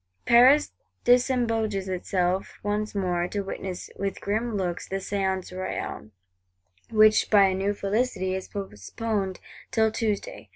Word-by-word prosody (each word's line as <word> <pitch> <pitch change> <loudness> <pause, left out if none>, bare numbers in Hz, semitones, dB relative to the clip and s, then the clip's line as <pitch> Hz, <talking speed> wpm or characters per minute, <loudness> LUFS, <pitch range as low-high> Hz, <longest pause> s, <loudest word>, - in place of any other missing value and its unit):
Paris 255 +5 +6 0.3
disembogues 230 -5 +2
itself 185 0 -1
once 210 +1 -2
more, 180 -3 0
to 205 +2 -3
witness, 190 -2 -6
"with 195 -1 -3
grim 220 +2 -1
looks," 180 -3 -3
the 195 - -3
Séance 190 -1 -2
Royale: 185 -11 -5 0.8
which, 215 -1 +5
by 205 -2 +6
a 190 - +2
new 195 +2 -1
felicity, 200 -2 -1
is 190 0 -4
postponed 195 - -4 0.3
till 220 -1 +2
Tuesday. 210 - -3
200 Hz, 125 wpm, -26 LUFS, 190-220 Hz, 0.8 s, Paris